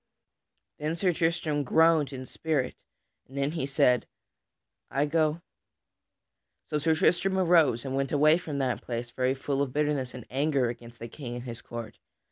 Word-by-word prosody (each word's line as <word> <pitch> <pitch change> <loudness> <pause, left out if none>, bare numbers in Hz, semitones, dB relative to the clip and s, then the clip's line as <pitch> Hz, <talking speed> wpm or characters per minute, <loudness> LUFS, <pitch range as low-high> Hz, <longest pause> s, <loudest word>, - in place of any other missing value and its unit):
Then 155 +2 -1
Sir 180 +1 +1
Tristram 165 -2 0
groaned 160 +1 +4
in 130 -1 -6
spirit, 140 -2 -1 0.5
and 135 - -11
then 140 +1 0
he 160 -5 -2
said, 125 -3 +3 0.8
"I 140 +2 +1
go." 155 +1 +1 1.2
So 150 - -1
Sir 160 +2 +2
Tristram 190 +4 +2
arose 165 -9 +4
and 135 0 -3
went 135 0 -1
away 155 +3 +5
from 155 -5 -5
that 130 -3 -1
place 120 0 -5
very 130 +1 0
full 140 +1 -2
of 135 -3 -2
bitterness 145 -4 0
and 125 - -8
anger 135 -2 +1
against 120 0 -9
the 115 - -7
King 120 0 -7
and 120 - -6
his 120 -2 -7
court. 115 -2 -8
140 Hz, 165 wpm, -28 LUFS, 125-160 Hz, 1.2 s, away